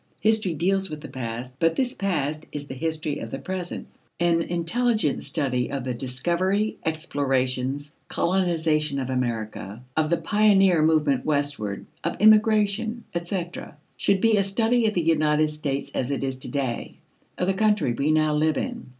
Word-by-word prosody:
History 215 Hz, -5 st, +2 dB
deals 190 Hz, +4 st, +1 dB
with 155 Hz, -1 st, -6 dB
the -, -, -7 dB
past, 125 Hz, +1 st, -6 dB
but 165 Hz, 0 st, +2 dB
this 255 Hz, -1 st, 0 dB
past 155 Hz, -, -1 dB
is 145 Hz, -1 st, -5 dB
the 140 Hz, -, -7 dB
history 155 Hz, +1 st, -2 dB
of 115 Hz, -, -6 dB
the 135 Hz, -, -4 dB
present. 180 Hz, +3 st, -5 dB, 0.3 s
An 170 Hz, -1 st, +3 dB
intelligent 175 Hz, -, 0 dB
study 135 Hz, -4 st, -1 dB
of 140 Hz, -2 st, -3 dB
the 125 Hz, 0 st, -2 dB
discovery, 170 Hz, -, 0 dB
explorations, 140 Hz, -2 st, -1 dB
colonization 160 Hz, -5 st, +1 dB
of 130 Hz, -1 st, -2 dB
America, 115 Hz, -3 st, -3 dB
of 155 Hz, -1 st, +1 dB
the 170 Hz, -, +2 dB
pioneer 195 Hz, -5 st, +4 dB
movement 155 Hz, -4 st, +3 dB
westward, 145 Hz, -9 st, -1 dB, 0.2 s
of -, -, -2 dB
immigration, 215 Hz, +1 st, +4 dB
etc., 175 Hz, -3 st, -4 dB, 0.2 s
should 195 Hz, -1 st, +1 dB
be 225 Hz, -2 st, +4 dB
a 200 Hz, -, +3 dB
study 225 Hz, +4 st, +2 dB
of 215 Hz, -, -1 dB
the 175 Hz, -, +2 dB
United 155 Hz, -1 st, +2 dB
States 145 Hz, -2 st, -3 dB
as 125 Hz, -, -1 dB
it 140 Hz, -1 st, -2 dB
is 135 Hz, -1 st, -2 dB
to 130 Hz, -, -8 dB
day: 135 Hz, -5 st, -3 dB, 0.4 s
of 180 Hz, -, 0 dB
the 195 Hz, -, +2 dB
country 210 Hz, -, +2 dB
we 140 Hz, +5 st, 0 dB
now 155 Hz, -1 st, +3 dB
live 155 Hz, +1 st, +2 dB
in. 245 Hz, -2 st, -4 dB
155 Hz, 165 wpm, -25 LUFS, 140-195 Hz, 0.4 s, pioneer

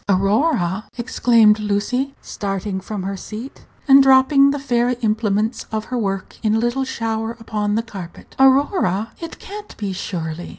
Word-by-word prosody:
"Aurora!" 195 Hz, -, +1 dB
exclaimed 230 Hz, -3 st, +3 dB
Lucy, 215 Hz, +7 st, -1 dB
starting 195 Hz, -1 st, -4 dB
from 200 Hz, 0 st, -5 dB
her 195 Hz, +1 st, -3 dB
seat 220 Hz, +7 st, -9 dB, 0.2 s
and 275 Hz, 0 st, +8 dB
dropping 270 Hz, +1 st, +5 dB
the 285 Hz, -, -1 dB
fairy 245 Hz, -2 st, 0 dB
implements 215 Hz, 0 st, 0 dB
of 215 Hz, 0 st, -3 dB
her 250 Hz, -, -4 dB
work 195 Hz, -3 st, -3 dB
in 215 Hz, -1 st, +1 dB
a -, -, +2 dB
little 240 Hz, +3 st, 0 dB
shower 225 Hz, -2 st, -3 dB
upon 210 Hz, -2 st, -2 dB
the 225 Hz, -, 0 dB
carpet; 190 Hz, -6 st, -10 dB
"Aurora!" 265 Hz, -, +3 dB
It 330 Hz, -1 st, -7 dB
can't 415 Hz, +1 st, -10 dB
be, 200 Hz, -3 st, -3 dB
surely? 170 Hz, -3 st, -5 dB
220 Hz, 155 wpm, -20 LUFS, 200-260 Hz, 0.2 s, and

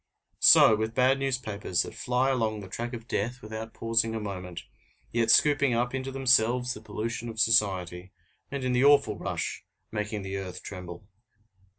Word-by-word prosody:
So 110 Hz, -, +7 dB
with 110 Hz, +1 st, -3 dB
bad 130 Hz, +1 st, +3 dB
newspapers 110 Hz, -9 st, -1 dB
that -, -, -9 dB
fly 125 Hz, +2 st, 0 dB
along 110 Hz, -4 st, -1 dB
the 95 Hz, -, -9 dB
track 120 Hz, +6 st, -5 dB
of 115 Hz, -1 st, -8 dB
death 120 Hz, +4 st, -3 dB
without 110 Hz, +1 st, -7 dB
pausing 115 Hz, 0 st, 0 dB
a -, -, -2 dB
moment, 90 Hz, -4 st, -6 dB, 0.5 s
yet 115 Hz, -1 st, 0 dB
scooping 140 Hz, +1 st, +4 dB
up 120 Hz, +2 st, -1 dB
into 135 Hz, 0 st, -4 dB
themselves 125 Hz, -1 st, +2 dB
the 105 Hz, -, -10 dB
pollution 110 Hz, +2 st, -5 dB
of 110 Hz, -1 st, -7 dB
society, 95 Hz, -5 st, +1 dB, 0.4 s
and 140 Hz, -2 st, -5 dB
in 125 Hz, -1 st, 0 dB
the 125 Hz, +1 st, +2 dB
awful 140 Hz, -7 st, +4 dB
rush -, -, -4 dB, 0.3 s
making 105 Hz, -1 st, -4 dB
the 95 Hz, 0 st, -4 dB
earth 90 Hz, -2 st, -7 dB
tremble. 90 Hz, -1 st, -9 dB
115 Hz, 170 wpm, -27 LUFS, 100-125 Hz, 0.5 s, So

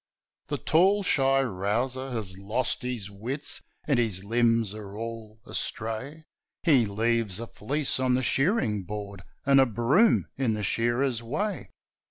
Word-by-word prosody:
The -, -, -2 dB
tall, 190 Hz, +6 st, +3 dB
shy 135 Hz, -5 st, +3 dB
rouser 120 Hz, +5 st, -1 dB
has 110 Hz, -7 st, -4 dB
lost 105 Hz, +6 st, -1 dB
his 120 Hz, -6 st, -4 dB
wits, 125 Hz, +9 st, -2 dB, 0.3 s
And 140 Hz, -5 st, +3 dB
his 105 Hz, -6 st, 0 dB
limbs 115 Hz, -1 st, +2 dB
are 105 Hz, -1 st, -9 dB
all 115 Hz, -1 st, -7 dB
astray; 115 Hz, +8 st, -3 dB, 0.4 s
He 135 Hz, -, +4 dB
leaves 110 Hz, -1 st, 0 dB
a 115 Hz, -, -4 dB
fleece 135 Hz, +6 st, -2 dB
on 130 Hz, -1 st, +2 dB
the 130 Hz, -, 0 dB
shearing 135 Hz, -, +1 dB
board, 100 Hz, 0 st, -7 dB, 0.2 s
And 140 Hz, -1 st, +6 dB
his 135 Hz, -2 st, +4 dB
broom 135 Hz, -, +3 dB
in 125 Hz, -5 st, +1 dB
the 105 Hz, -, -4 dB
shearer's 120 Hz, +4 st, +1 dB
way. 195 Hz, -, -3 dB
120 Hz, 145 wpm, -27 LUFS, 105-135 Hz, 0.4 s, And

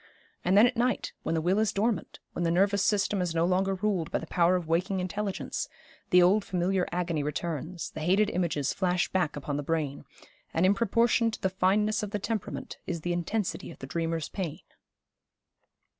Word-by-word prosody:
And 185 Hz, +3 st, +3 dB
then 215 Hz, -, +8 dB
at 250 Hz, +1 st, +1 dB
night, 245 Hz, +1 st, 0 dB
when 165 Hz, -, -1 dB
the 160 Hz, -, +1 dB
will 185 Hz, +5 st, +2 dB
is 220 Hz, -2 st, +2 dB
dormant, 215 Hz, +2 st, -1 dB, 0.2 s
when -, -, -4 dB
the 170 Hz, -, +2 dB
nervous 195 Hz, +3 st, +3 dB
system 205 Hz, -1 st, +1 dB
is 175 Hz, -2 st, -2 dB
no 165 Hz, +1 st, +3 dB
longer 190 Hz, +2 st, +1 dB
ruled 190 Hz, -4 st, -1 dB
by -, -, 0 dB
the -, -, -6 dB
power 175 Hz, +1 st, +3 dB
of 180 Hz, -2 st, -1 dB
waking 185 Hz, +4 st, +1 dB
intelligence, 195 Hz, +2 st, -3 dB, 0.4 s
the 180 Hz, 0 st, +6 dB
old 195 Hz, +4 st, +4 dB
familiar 185 Hz, 0 st, 0 dB
agony 170 Hz, -3 st, -1 dB
returns, 160 Hz, +3 st, -4 dB
the -, -, -7 dB
hated 190 Hz, +6 st, +2 dB
images 165 Hz, -6 st, 0 dB
flash 180 Hz, -1 st, +1 dB
back 180 Hz, -5 st, 0 dB
upon 145 Hz, 0 st, -3 dB
the -, -, -1 dB
brain, 145 Hz, -2 st, -2 dB, 0.5 s
and 165 Hz, +3 st, +3 dB
in 190 Hz, -, +5 dB
proportion 230 Hz, +2 st, +2 dB
to 220 Hz, -, -6 dB
the 190 Hz, -, 0 dB
fineness 205 Hz, +3 st, +2 dB
of 210 Hz, -, -3 dB
the 210 Hz, -, -2 dB
temperament 215 Hz, 0 st, -4 dB
is 170 Hz, -2 st, -3 dB
the 175 Hz, +2 st, -1 dB
intensity 180 Hz, +4 st, -2 dB
of 170 Hz, -, -10 dB
the -, -, -8 dB
dreamer's 165 Hz, +2 st, -2 dB
pain.' 180 Hz, -7 st, -5 dB
185 Hz, 195 wpm, -28 LUFS, 170-200 Hz, 0.5 s, then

